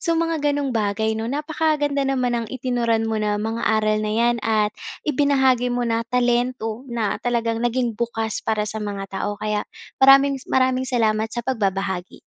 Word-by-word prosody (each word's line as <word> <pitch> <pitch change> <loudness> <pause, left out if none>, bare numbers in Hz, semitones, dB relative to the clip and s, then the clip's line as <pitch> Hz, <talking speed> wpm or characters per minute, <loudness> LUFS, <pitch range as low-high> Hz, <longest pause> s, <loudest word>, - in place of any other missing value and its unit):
so 335 0 0
mga 330 -1 0
ganung 285 -2 0
bagay, 220 0 0
'no? 220 +1 -3
Napakaganda 295 0 0
naman 255 -2 0
ng 230 - -5
itinuran 240 -3 0
mo 220 -1 -1
na, 210 -1 0
mga 225 +2 -3 0.2
aral 215 0 +1
na 215 0 -2
yan 235 +1 +3
at 215 -1 +1 0.3
ibinahagi 265 -4 +2
mo 245 0 -1
na 230 -1 0
talento 245 0 0
na 230 -4 -2
talagang 230 -2 -1
naging 240 0 0
bukas 225 -1 -3
para 215 -1 -1
sa 215 +1 -5
mga 200 -2 -4
tao 205 +1 -3
kaya 210 0 -2 0.3
maraming 275 0 +6
s - - -18
maraming 260 0 +1
salamat 220 -3 +1
sa 240 +1 -5
pagbabahagi. 195 -6 -2
235 Hz, 170 wpm, -22 LUFS, 215-260 Hz, 0.3 s, maraming